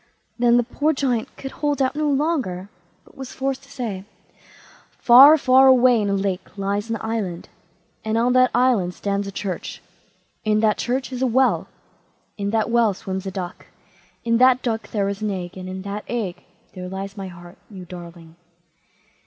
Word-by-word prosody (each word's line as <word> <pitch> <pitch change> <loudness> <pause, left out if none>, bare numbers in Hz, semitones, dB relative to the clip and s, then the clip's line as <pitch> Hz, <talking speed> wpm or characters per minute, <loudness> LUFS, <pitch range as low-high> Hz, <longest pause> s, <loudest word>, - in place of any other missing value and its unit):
Then 240 0 +4
the 245 - +3
poor 295 +6 0
Giant 255 -5 -2
could 270 - -7
hold 290 -1 -2
out 265 +1 +1
no 300 0 0
longer, 270 - -1 0.4
but - - -21
was 265 -2 -8
forced 270 0 -3
to 275 0 -19
say: 225 -9 -5 0.9
"Far, 270 +6 +8
far 265 -1 +5
away 250 -3 +5
in 205 - -1
a 200 - +1
lake 195 0 -3
lies 200 +2 -2
an 230 - -1
island; 215 -6 -4 0.5
on 230 +3 +1
that 255 0 +5
island 225 -9 +2
stands 200 0 -2
a - - -5
church; 190 -3 -5 0.6
in 215 0 +2
that 215 -1 +2
church 260 +2 -2
is 250 - -5
a 260 - +2
well; 260 +2 +2 0.7
in 200 -1 -3
that 220 +1 0
well 230 -4 +3
swims 190 0 -5
a - - -3
duck; 185 -2 -7 0.6
in 230 0 +2
that 255 0 +5
duck 225 -2 -3
there 200 -2 -1
is 200 +1 -4
an 215 - -1
egg, 180 -3 -5
and 185 0 -7
in 185 0 -6
that 200 +1 -5
egg 215 -7 -4 0.3
there 180 0 -7
lies 195 +1 -6
my 195 -2 -6
heart,—you 180 +2 -12
darling!" 170 -2 -11
220 Hz, 180 wpm, -22 LUFS, 190-255 Hz, 0.9 s, Far